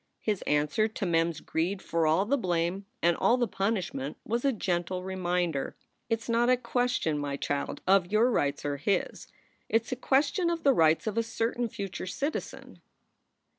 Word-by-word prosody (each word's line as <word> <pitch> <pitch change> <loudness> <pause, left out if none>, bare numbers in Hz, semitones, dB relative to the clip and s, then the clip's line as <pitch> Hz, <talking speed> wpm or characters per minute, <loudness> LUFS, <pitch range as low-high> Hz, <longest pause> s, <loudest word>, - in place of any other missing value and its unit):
His 210 -3 -1
answer 150 +9 +2
to 220 -2 -4
Mem 165 -1 +3
s 160 -2 -7
greed 175 +5 -1
for 165 -3 0
all 165 +6 +3
the 265 +7 +2
blame 180 -3 -1 0.2
and 170 0 +4
all 240 - +3
the 240 -2 +1
punishment 185 -10 -2
was 235 +2 -1
a 275 - +3
gentle 180 -4 -2
reminder: 180 -5 -1 0.3
"It 225 0 0
s - - -11
not 235 +1 +2
a 255 - +5
question, 245 -12 0
my 140 -1 -3
child, 140 0 -3
of 190 -1 +3
your 225 +4 +4
rights 145 -8 0
or 145 -1 -1
his. 190 +8 -1 0.4
It 225 0 +3
s 230 - -11
a - - 0
question 285 +7 +2
of 335 -1 -2
the 275 - +5
rights 160 -5 +3
of 220 +1 0
a - - +4
certain 230 +1 -2
future 200 -4 -5
citizen. 280 - -4
195 Hz, 185 wpm, -29 LUFS, 165-235 Hz, 0.4 s, a